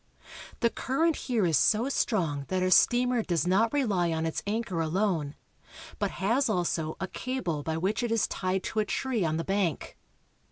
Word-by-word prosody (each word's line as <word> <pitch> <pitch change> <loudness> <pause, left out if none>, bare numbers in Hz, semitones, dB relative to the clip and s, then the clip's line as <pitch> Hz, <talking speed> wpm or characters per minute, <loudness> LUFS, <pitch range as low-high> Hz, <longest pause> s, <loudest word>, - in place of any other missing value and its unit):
The 235 - +3
current 320 +5 0
here 235 -7 0
is 160 -6 +3
so 225 +4 +3
strong 165 - 0
that 185 -1 -1
our 185 - +1
steamer 245 +4 +4
does 170 -7 -1
not 200 +6 +2
rely 200 -12 +1
on 160 0 -1
its 160 - -2
anchor 210 -5 -1
alone, 165 -3 -1 0.6
but - - 0
has 235 +7 +1
also 170 -5 -1
a 190 - -3
cable 235 - -3
by 160 +2 -3
which 195 +7 -1
it 240 -1 -2
is 230 -2 +2
tied 185 0 -2
to 220 - -2
a 215 - +1
tree 240 -1 -1
on 160 -1 0
the 165 - -2
bank. 195 -5 -2
190 Hz, 185 wpm, -28 LUFS, 165-235 Hz, 0.6 s, steamer